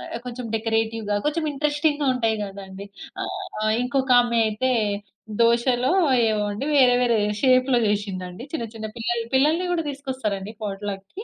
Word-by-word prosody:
ఆహ్, - - -4
కొంచెం 250 0 -6
డెకరేటివ్‌గా, 225 -1 -1
కొంచెం 315 +2 0
ఇంట్రెస్టింగ్‌గా 290 0 0
ఉంటాయి 225 -3 +1
కదండీ! 195 0 -8 0.4
ఆహ్, 365 - -3
ఇంకొక 265 0 0
ఆమె 235 -1 -1
అయితే 235 +5 0 0.7
దోసలో 240 +3 +3 0.4
ఏమోండి 210 +3 -1
వేరే, 255 -3 +6
వేరే 235 -2 +3 0.2
షేప్‌లో 255 -1 +4
చేసిందండి 195 -1 -3
చిన్న, 235 -7 -2
చిన్న 220 -1 -5
పిల్లలు 235 0 -1
పిల్లల్ని 310 +7 +3
కూడా 330 -2 -1
తీసుకొస్తారండి 260 -8 -4
పాట్‌లక్‌కి. 200 - -5
235 Hz, 130 wpm, -23 LUFS, 210-270 Hz, 0.7 s, వేరే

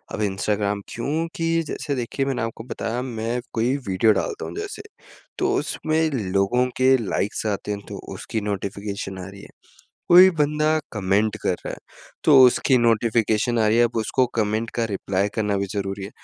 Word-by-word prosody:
अब - - -4
इंस्टाग्राम 100 0 -1
क्योंकि 165 +6 -2 0.2
जैसे 145 -1 -3
देखिए 130 +2 -2
मैंने 135 -2 -2
आपको 115 0 -4
बताया 120 0 -3
मैं 120 -1 -3
कोई 120 +4 +1
वीडियो 95 +4 +3
डालता 410 - -3
हूँ - - -7
जैसे, 415 0 -5 0.6
तो - - +1
उसमें 160 0 0 0.2
लोगों 100 +6 +2
के 130 +1 +5
लाइक्स 100 +2 -2
आते 100 - -4
हैं, 100 - -3
तो - - -6 0.2
उसकी 110 - -4
नोटिफ़िकेशन 100 -1 -4
आ 90 - -7
रही 100 0 -12
है। - - -13 0.6
कोई 180 +2 +9
बंदा 150 +1 +2
कमेंट 105 0 +1
कर - - +1
रहा - - -4
है, - - -6 0.5
तो 145 -3 +7
उसकी 130 +1 +3
नोटिफिकेशन 115 0 +2
आ 110 - +3
रही 110 - +3
है, 120 - +6
अब 120 0 -2
उसको 125 +4 +1
कमेंट 110 +1 0
का 115 - 0
रिप्लाई 100 -1 -1
करना 105 -2 0
भी 100 - -1
ज़रूरी 100 -1 -3
है। 100 - -7
115 Hz, 175 wpm, -23 LUFS, 100-130 Hz, 0.6 s, कोई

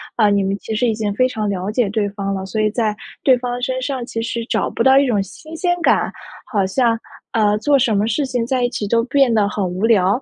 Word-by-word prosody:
啊， 215 -3 +4
你 200 -1 +2
们 195 +1 -1
其 220 +2 -5
实 245 +3 +1
已 225 - +1
经 210 -2 -2
非 255 +5 +3
常 215 -4 -2
了 190 0 -2
解 220 -2 +1
对 205 0 -1
方 200 -1 -3
了， 190 -1 -4
所 205 +3 -4
以 215 - +2
在 215 -2 0 0.3
对 260 -2 +5
方 245 0 -4
身 255 +1 -1
上 260 -1 -3
其 225 -1 -4
实 230 0 -3
找 - - -1
不 - - -1
到 265 0 +6
一 280 - +5
种 215 -5 +1
新 310 - -11
鲜 350 +1 0
感， - - +2 0.4
好 200 -3 +1
像 230 +3 +1 0.3
呃， 210 -2 +2
做 280 +6 +3
什 240 -5 +2
么 205 +2 +1
事 230 +6 0
情 250 -3 -2
在 255 0 0
一 245 - +2
起 210 -4 -4
都 230 +3 +2
变 270 -1 +3
得 210 -2 +3
很 205 0 -2
无 185 +3 -1
聊。 205 +1 +3
225 Hz, 280 characters per minute, -19 LUFS, 205-250 Hz, 0.4 s, 到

